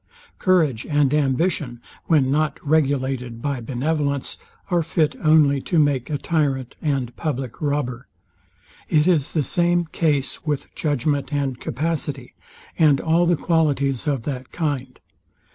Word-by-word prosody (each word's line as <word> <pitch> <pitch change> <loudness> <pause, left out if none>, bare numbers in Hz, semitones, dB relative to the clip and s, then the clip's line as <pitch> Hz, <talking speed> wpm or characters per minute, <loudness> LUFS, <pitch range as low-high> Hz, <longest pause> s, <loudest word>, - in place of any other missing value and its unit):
Courage 160 - +2
and 145 -2 +2
ambition, 145 -2 0 0.3
when 140 -5 +3
not 150 0 0
regulated 135 -5 0
by 140 0 -2
benevolence, 140 +3 -2 0.4
are 175 -1 +3
fit 160 -1 0
only 150 -3 +4
to 170 - -1
make 145 -5 +2
a 150 - -1
tyrant 140 -5 -1
and 135 -5 -1
public 135 -6 -4
robber. 140 -4 -2 0.8
It 155 0 +3
is 160 -7 +2
the 155 - +1
same 175 +2 +2
case 150 -4 -1
with 150 -3 -3
judgment 145 0 -1
and 140 -4 -1
capacity, 155 +5 -3 0.5
and 150 -4 +5
all 170 +2 +2
the 175 -1 +3
qualities 145 -6 +1
of 135 -5 0
that 130 -2 -5
kind. 140 -6 -3
145 Hz, 130 wpm, -22 LUFS, 135-160 Hz, 0.8 s, and